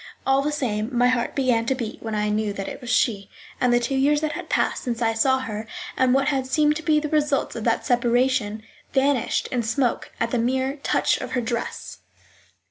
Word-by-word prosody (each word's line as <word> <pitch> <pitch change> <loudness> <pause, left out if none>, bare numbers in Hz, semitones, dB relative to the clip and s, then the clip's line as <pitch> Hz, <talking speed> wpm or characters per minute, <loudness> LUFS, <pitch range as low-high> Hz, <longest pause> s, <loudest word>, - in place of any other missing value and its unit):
All 270 +1 +3
the 295 +2 -1
same, 225 -7 -2
my 245 +1 +4
heart 250 -1 0
began 245 -4 +1
to 265 - +2
beat 235 -4 -6
when 220 -1 -4
I 210 0 0
knew 210 -1 0
that 195 -1 -5
it - - -7
was 245 - -7
she; 200 -5 +1 0.3
and 250 - +3
the 240 - +4
two 240 +3 -2
years 285 +2 +2
that 310 -1 -1
had - - -7
passed - - +1
since 235 -2 -3
I 225 -1 +1
saw 260 +4 +3
her, 220 -3 -5 0.3
and 260 -1 +3
what 275 0 +2
had 265 -3 -1
seemed 300 +2 +2
to - - -6
be 305 0 +3
the 300 - -3
results 295 -2 0
of 225 - -5
that 230 -1 +1
separation, 240 -3 +1 0.3
vanished 265 -3 +1
in 245 - 0
smoke 235 +2 -1
at 230 0 -1
the 245 - +1
mere 260 +4 0
touch 275 - +1
of - - -6
her 250 - +1
dress. 235 0 -4
250 Hz, 220 wpm, -23 LUFS, 230-270 Hz, 0.3 s, my